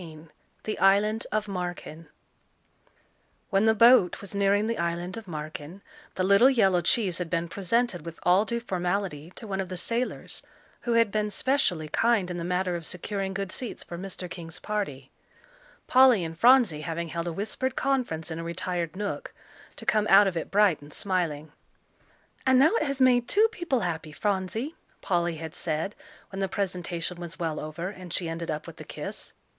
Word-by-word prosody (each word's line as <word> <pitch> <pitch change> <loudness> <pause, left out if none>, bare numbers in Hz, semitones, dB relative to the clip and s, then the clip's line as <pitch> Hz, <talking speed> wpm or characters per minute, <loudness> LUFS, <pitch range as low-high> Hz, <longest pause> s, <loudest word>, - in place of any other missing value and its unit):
XIV 160 -2 -11 0.3
THE 215 - -3
ISLAND 205 +3 +3
OF 215 0 0
MARKEN 175 -4 -5 1.4
When 195 +1 +3
the 220 0 +4
boat 230 -5 +6
was 200 -2 -8
nearing 200 +1 +2
the 230 +1 -2
island 170 +1 -2
of 225 -3 -8
Marken, 155 +3 -7 0.3
the 185 - 0
little 200 +7 +6
yellow 195 -9 +3
cheese 185 0 +1
had 175 -2 -3
been 170 0 -1
presented 195 0 0
with 165 0 -8
all 180 +3 +5
due 235 +2 -2
formality 180 -6 -2
to - - -7
one 195 -2 -3
of 185 - -6
the 185 - -5
sailors 235 +7 -2 0.5
who - - +3
had 230 -2 +4
been 210 0 0
specially 205 - 0
kind 215 0 +2
in 175 - -4
the 170 - -4
matter 180 +1 0
of 170 - -5
securing 190 +2 -3
good 195 -1 -3
seats 250 - -5
for 175 - -8
Mr. 185 0 -5
King's 170 -1 -8
party, 145 -12 -4 0.7
Polly 255 -6 +6
and 165 0 -5
Phronsie 235 - +5
having 165 +1 -4
held 170 +1 -3
a - - -1
whispered 220 +8 -2
conference 240 -13 -1
in 160 - -4
a - - -4
retired 170 -1 -3
nook, 205 +1 -4 0.4
to - - -10
come 215 -1 +2
out 200 +2 +8
of 190 -3 -1
it 165 - -3
bright 200 -7 +3
and 145 +1 -13
smiling. 160 -5 -2 0.9
"And 260 -1 +4
now 290 +6 +6
it 310 - 0
has 275 -1 -2
made 245 -2 +4
two 425 - +4
people 345 - -1
happy, 160 -4 -3
Phronsie," 205 - -2 0.3
Polly 175 -2 0
had 160 0 -7
said, 160 +4 -2 0.4
when 195 - -5
the 195 -1 0
presentation 180 -3 -3
was 170 -1 -7
well 160 -3 -2
over, 155 +4 -5
and 185 -3 -10
she 175 0 -1
ended 165 +1 -4
up 150 0 -3
with - - -10
a - - -6
kiss. - - -7
185 Hz, 185 wpm, -27 LUFS, 170-215 Hz, 1.4 s, out